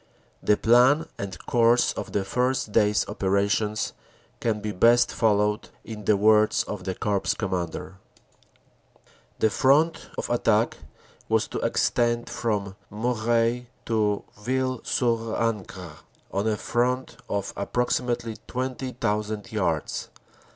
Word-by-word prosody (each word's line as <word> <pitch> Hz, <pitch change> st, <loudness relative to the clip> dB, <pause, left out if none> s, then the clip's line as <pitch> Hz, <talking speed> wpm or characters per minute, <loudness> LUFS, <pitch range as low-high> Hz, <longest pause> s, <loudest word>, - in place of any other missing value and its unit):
The 105 Hz, -, +3 dB
plan 130 Hz, +7 st, +4 dB
and 95 Hz, -3 st, -5 dB
course 120 Hz, 0 st, +3 dB
of -, -, -6 dB
the 100 Hz, -1 st, -1 dB
first 125 Hz, +1 st, 0 dB
day 105 Hz, 0 st, +4 dB
s 105 Hz, -2 st, +1 dB
operations 100 Hz, +2 st, 0 dB, 0.5 s
can 110 Hz, -2 st, 0 dB
be 105 Hz, 0 st, -3 dB
best 120 Hz, +5 st, +4 dB
followed 105 Hz, -1 st, +1 dB
in 105 Hz, -2 st, -8 dB
the 105 Hz, 0 st, +4 dB
words 105 Hz, +1 st, +4 dB
of 100 Hz, -3 st, -6 dB
the 95 Hz, -1 st, -2 dB
Corps 100 Hz, -2 st, 0 dB
Commander: 95 Hz, -1 st, -4 dB, 1.1 s
u -, -, -29 dB, 0.3 s
The 110 Hz, -, +2 dB
front 150 Hz, +6 st, +2 dB
of -, -, -2 dB
attack -, -, +2 dB, 0.5 s
was -, -, +2 dB
to -, -, -3 dB
extend 120 Hz, 0 st, +1 dB
from 100 Hz, -4 st, -2 dB, 0.2 s
Moreuil 115 Hz, +2 st, 0 dB, 0.2 s
to 105 Hz, -3 st, +1 dB, 0.2 s
Ville 130 Hz, +2 st, -1 dB
sur 115 Hz, -2 st, 0 dB
Ancre 95 Hz, -8 st, -3 dB, 0.3 s
on 100 Hz, +3 st, -1 dB
a 110 Hz, -1 st, +1 dB
front 125 Hz, +3 st, -1 dB
of 100 Hz, -1 st, -2 dB
approximately 120 Hz, +1 st, -1 dB
20,000 120 Hz, -4 st, -3 dB
yards. 85 Hz, -8 st, -1 dB
110 Hz, 125 wpm, -25 LUFS, 105-120 Hz, 1.1 s, plan